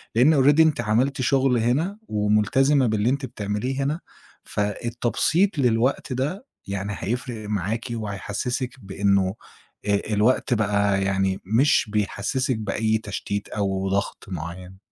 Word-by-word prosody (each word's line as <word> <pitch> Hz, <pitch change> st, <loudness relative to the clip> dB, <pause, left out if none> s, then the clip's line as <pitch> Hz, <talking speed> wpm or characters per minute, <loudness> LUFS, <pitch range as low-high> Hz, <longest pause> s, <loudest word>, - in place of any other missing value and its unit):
لإن 135 Hz, +3 st, +5 dB
already 145 Hz, +3 st, +5 dB
أنتِ 155 Hz, -6 st, +3 dB
عملتِ 125 Hz, +5 st, +1 dB
شُغل 130 Hz, -1 st, +3 dB
هنا 150 Hz, -, 0 dB
ومُلتزمة 105 Hz, +6 st, +2 dB
باللي 110 Hz, +2 st, +1 dB
أنتِ 135 Hz, 0 st, -1 dB
بتعمليه 120 Hz, +4 st, -3 dB
هنا، 150 Hz, +5 st, -1 dB, 0.4 s
فالتبسيط 120 Hz, -, 0 dB
للوقت 125 Hz, +2 st, +1 dB
ده 150 Hz, -, -2 dB, 0.2 s
يعني 100 Hz, +1 st, -3 dB
هيفرق 110 Hz, +2 st, -4 dB
معاكِ، 105 Hz, +3 st, -2 dB
وهيحسّسِك 115 Hz, +4 st, -3 dB
بإنّه 100 Hz, -1 st, +1 dB, 0.5 s
آآ 100 Hz, -1 st, +2 dB
الوقت 120 Hz, +4 st, +2 dB
بقي 100 Hz, -2 st, +1 dB
يعني 95 Hz, 0 st, 0 dB
مش 115 Hz, +3 st, +3 dB
بيحسّسِك 115 Hz, +5 st, -1 dB
بأي 110 Hz, +1 st, 0 dB
تشتيت 100 Hz, -1 st, -4 dB
أو 95 Hz, -2 st, -1 dB
ضغط 100 Hz, +1 st, -2 dB
معيّن. 90 Hz, +2 st, -7 dB
110 Hz, 120 wpm, -24 LUFS, 100-130 Hz, 0.5 s, لإن